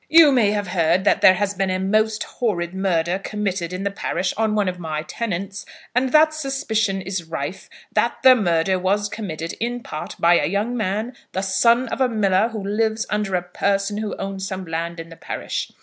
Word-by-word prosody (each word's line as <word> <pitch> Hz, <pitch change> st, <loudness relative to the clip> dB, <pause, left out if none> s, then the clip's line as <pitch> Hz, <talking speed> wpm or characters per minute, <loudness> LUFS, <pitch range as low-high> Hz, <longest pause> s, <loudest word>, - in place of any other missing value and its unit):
You 315 Hz, -1 st, +8 dB
may 240 Hz, -6 st, +4 dB
have 205 Hz, -2 st, -1 dB
heard 175 Hz, +1 st, +2 dB
that 205 Hz, -, +3 dB
there 185 Hz, -, +7 dB
has 205 Hz, +1 st, -1 dB
been 195 Hz, -1 st, -1 dB
a 185 Hz, -, 0 dB
most 215 Hz, +3 st, +1 dB
horrid 180 Hz, -7 st, -2 dB
murder 185 Hz, -2 st, 0 dB
committed 195 Hz, -4 st, -3 dB
in 185 Hz, +1 st, -4 dB
the 200 Hz, -, -1 dB
parish 180 Hz, -2 st, -2 dB
on 220 Hz, 0 st, +1 dB
one 205 Hz, -2 st, +1 dB
of 180 Hz, -1 st, -3 dB
my 155 Hz, -2 st, -3 dB
tenants; 195 Hz, +1 st, -4 dB, 0.3 s
and 255 Hz, +1 st, +1 dB
that 310 Hz, +1 st, +5 dB
suspicion 220 Hz, -9 st, -1 dB
is 185 Hz, -2 st, -4 dB
rife 160 Hz, +1 st, -5 dB, 0.2 s
that -, -, +1 dB
the 260 Hz, -1 st, +9 dB
murder 185 Hz, -3 st, +1 dB
was 200 Hz, +3 st, +1 dB
committed 165 Hz, -7 st, -5 dB
in 240 Hz, +1 st, -3 dB
part 155 Hz, -, -6 dB
by 170 Hz, +1 st, +5 dB
a -, -, 0 dB
young 205 Hz, +6 st, -1 dB
man, 215 Hz, +3 st, -2 dB, 0.2 s
the 190 Hz, -, -1 dB
son 230 Hz, +6 st, +3 dB
of -, -, -3 dB
a 255 Hz, -, +4 dB
miller 205 Hz, -2 st, +2 dB
who 220 Hz, -3 st, -6 dB
lives 220 Hz, +2 st, 0 dB
under 210 Hz, -3 st, 0 dB
a 175 Hz, -, 0 dB
person 195 Hz, +3 st, -1 dB
who 215 Hz, -1 st, -3 dB
owns 195 Hz, 0 st, -4 dB
some 190 Hz, -1 st, -5 dB
land 165 Hz, +1 st, -4 dB
in 165 Hz, 0 st, -8 dB
the 165 Hz, -, -11 dB
parish. -, -, -4 dB
195 Hz, 205 wpm, -22 LUFS, 180-220 Hz, 0.3 s, the